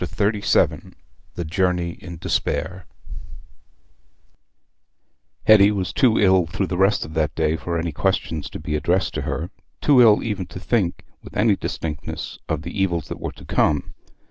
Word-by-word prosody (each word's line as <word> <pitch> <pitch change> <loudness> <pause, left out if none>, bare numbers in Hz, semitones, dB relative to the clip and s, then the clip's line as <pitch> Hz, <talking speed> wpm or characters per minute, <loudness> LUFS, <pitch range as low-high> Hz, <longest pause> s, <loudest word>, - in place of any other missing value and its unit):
Chapter 105 +3 0
XXXVII - - +1 0.4
The 85 - -4
Journey 90 +1 0
in 85 0 -10
Despair 80 +3 -2 2.6
Hetty 105 -2 +7
was 100 -3 -2
too 130 -6 +3
ill 95 -4 +4
through 95 +4 -2
the 90 0 -3
rest 95 +3 +3
of 75 - -10
that 80 -2 0
day 80 -1 +1
for 85 +1 -3
any 85 0 -2
questions 80 -2 -1
to - - -8
be 75 - -3
addressed 90 +5 0
to - - -2
her—too 65 - 0
ill 110 -3 +6
even 105 -5 -3
to - - -9
think 95 -4 -1 0.2
with - - -10
any 105 -1 +4
distinctness 75 -5 -5
of 80 -1 -2
the 85 - -6
evils 85 -6 -1
that - - -6
were - - -5
to - - -14
come. 75 -3 +1
90 Hz, 160 wpm, -22 LUFS, 80-100 Hz, 2.6 s, Hetty